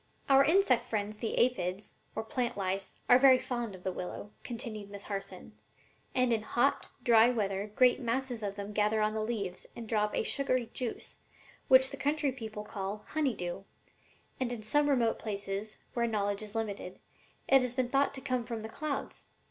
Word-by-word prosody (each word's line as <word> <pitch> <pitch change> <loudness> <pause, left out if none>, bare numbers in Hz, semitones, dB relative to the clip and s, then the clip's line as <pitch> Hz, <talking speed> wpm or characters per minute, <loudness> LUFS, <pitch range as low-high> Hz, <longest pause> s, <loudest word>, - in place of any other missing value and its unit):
"Our 275 0 +7
insect 320 -6 +3
friends 210 -1 -2
the 225 - -2
aphides, 205 -6 0 0.2
or 220 - -2
plant 240 +1 -2
lice, 195 0 -2
are 245 - +7
very 260 -1 +8
fond 240 -5 -4
of 180 - -14
the 190 - -1
willow," 180 +3 -6
continued 225 -4 -5
Miss 200 0 -7
Harson, 195 -1 -6 0.6
"and 255 -2 +3
in 220 - +1
hot, 240 +5 +1
dry 230 0 +6
weather 205 -3 -1
great 250 -1 +5
masses 250 -1 -1
of 200 -1 -3
them 200 +1 -6
gather 210 +1 +2
on 215 0 +1
the 220 - -1
leaves 210 -5 -3
and 230 -1 -7
drop 210 -1 +1
a - - +1
sugary 255 -3 0
juice, 250 -3 -5 0.5
which 260 0 +7
the - - -6
country 290 0 +1
people 220 -5 -6
call 205 0 -5
'honey 290 -6 0
dew,' 175 +1 -4 0.8
and 255 -2 -1
in 230 -3 -5
some 290 +7 +2
remote 240 -5 +2
places, 200 0 -4 0.2
where 235 -1 +1
knowledge 205 -2 -1
is 215 0 -8
limited, 205 -4 -3 0.5
it 270 -1 +6
has 250 -1 -1
been 255 -2 0
thought 280 +1 +2
to 265 - -7
come 255 -2 -1
from 230 -1 -5
the 220 - -6
clouds. 300 +4 -4
225 Hz, 185 wpm, -31 LUFS, 205-255 Hz, 0.8 s, very